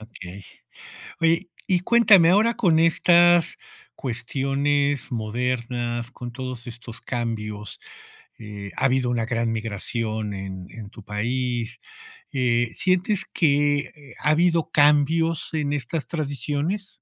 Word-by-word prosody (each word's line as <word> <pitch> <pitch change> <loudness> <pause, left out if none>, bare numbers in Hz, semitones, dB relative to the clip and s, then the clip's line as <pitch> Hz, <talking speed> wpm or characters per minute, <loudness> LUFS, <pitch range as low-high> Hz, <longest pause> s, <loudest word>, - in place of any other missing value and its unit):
Okey. 100 -3 -11 0.8
Oye, 165 +1 +2 0.2
y 180 -2 +3
cuéntame, 205 -6 +6
ahora 220 +5 +3
con 165 -6 +3
estas 175 +1 +4 0.4
cuestiones 140 +3 -1
modernas, 120 +1 -2
con 120 -1 -8
todos 130 -1 -6
estos 115 -1 -9
cambios, 105 -4 -4 0.6
eh, 105 -2 -8
ha - - 0
habido 130 -2 +2
una 115 -2 0
gran 115 0 -1
migración 110 0 -3
en 95 -2 -7
en 110 -3 -9
tu 105 - -13
país, 120 +2 -2 0.5
eh, 120 -3 +1
¿sientes 185 +2 +1
que 145 -3 0
ha 150 - +3
habido 165 -1 +2
cambios 150 +2 +3
en 145 -2 -1
estas 145 +3 -3
tradiciones? 150 - -3
130 Hz, 115 wpm, -24 LUFS, 115-160 Hz, 0.8 s, cuéntame